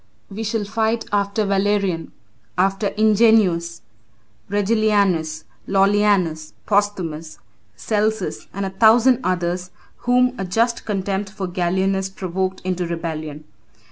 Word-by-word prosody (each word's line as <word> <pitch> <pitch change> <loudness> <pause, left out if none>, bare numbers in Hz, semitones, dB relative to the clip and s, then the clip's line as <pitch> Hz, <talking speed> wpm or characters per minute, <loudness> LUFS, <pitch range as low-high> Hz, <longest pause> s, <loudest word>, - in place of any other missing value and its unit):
We 215 +3 -5
shall 215 0 -1
fight 225 +2 -1
after 205 +1 0
Valerian, 195 -3 0 0.5
after 195 +3 +1
Ingenuus, 210 -6 +3 0.7
Regillianus, 200 -6 +1 0.2
Lollianus, 195 -5 +2
Posthumus, 180 -7 -1 0.4
Celsus, 215 -2 -2
and 200 +1 -3
a 190 - -4
thousand 230 +6 +5
others, 180 0 -1 0.3
whom 250 0 +2
a - - -1
just 230 +6 0
contempt 195 -1 -2
for 195 -1 -5
Gallienus 190 +2 0
provoked 190 0 -3
into 180 -1 -2
rebellion. 155 -3 -5
195 Hz, 105 wpm, -21 LUFS, 180-210 Hz, 0.7 s, thousand